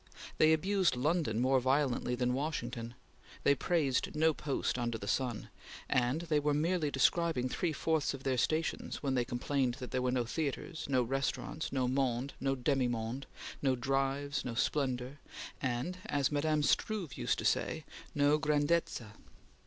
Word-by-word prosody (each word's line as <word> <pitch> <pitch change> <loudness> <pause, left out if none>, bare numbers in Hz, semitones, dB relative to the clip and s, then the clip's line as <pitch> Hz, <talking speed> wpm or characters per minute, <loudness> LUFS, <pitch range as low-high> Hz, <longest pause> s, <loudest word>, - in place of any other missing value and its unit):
They 155 - +6
abused 185 0 +2
London 145 -4 +1
more 130 +2 +3
violently 130 -1 +1
than 125 0 0
Washington; 125 -5 -3 0.5
they 140 - +5
praised 140 -2 0
no 160 +1 +4
post 140 -3 -2
under 120 -1 -1
the 100 - -7
sun; 125 -3 -1 0.4
and 130 +5 +1
they 155 -3 +1
were 145 0 +1
merely 160 0 +1
describing 140 -1 +2
three 165 +6 -1
fourths 155 -1 0
of 135 - -11
their 130 -2 +1
stations 155 +4 -1
when 135 -2 +1
they 125 -2 +2
complained 125 +1 -1
that 125 -2 -7
there 130 - 0
were 125 - +1
no 125 -1 +1
theatres, 155 +5 -3
no 130 -2 +3
restaurants, 135 +5 -2
no 130 -2 +1
monde, 130 0 0
no 135 0 0
demi 130 0 +1
monde, 120 +3 -3 0.3
no 135 -2 +2
drives, 135 +2 -1
no 120 -2 -4
splendor, 130 +2 -1 0.4
and, 130 +8 -2
as 145 -1 +1
Mme. 150 +1 +1
de - - -1
Struve 190 -4 0
used - - 0
to - - -4
say, - - 0 0.3
no 145 +1 +4
grandezza. 150 -6 0
135 Hz, 160 wpm, -33 LUFS, 125-150 Hz, 0.5 s, They